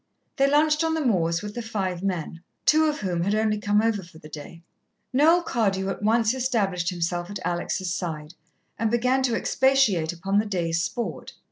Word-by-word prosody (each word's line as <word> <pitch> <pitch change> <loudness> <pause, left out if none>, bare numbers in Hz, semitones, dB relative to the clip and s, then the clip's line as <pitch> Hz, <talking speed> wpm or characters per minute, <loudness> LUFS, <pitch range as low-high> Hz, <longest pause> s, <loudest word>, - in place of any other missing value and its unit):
They 275 0 +4
lunched 300 +2 +3
on 320 0 +1
the 315 -3 -1
moors 170 -7 +1
with 210 0 -6
the 240 - -4
five 195 -6 -3
men, 170 -4 -3 0.2
two 315 +1 +5
of 300 -5 -1
whom 180 -4 -1
had 200 +4 +1
only 215 -1 +1
come 210 +1 +2
over 225 -3 +1
for 170 -3 -15
the 150 - -12
day. 155 +3 -10 0.5
Noel 325 +6 +5
Cardew 195 - 0
at - - -4
once 225 +2 +2
established 205 -9 0
himself 175 0 -2
at 205 - -5
Alex' 175 +1 -2
side 165 -3 -4 0.5
and 225 0 +1
began 250 +3 +2
to 250 -3 +1
expatiate 230 -13 +2
upon 195 +4 0
the 215 - -1
day's 170 -4 -1
sport. 185 - -4
205 Hz, 190 wpm, -25 LUFS, 175-245 Hz, 0.5 s, two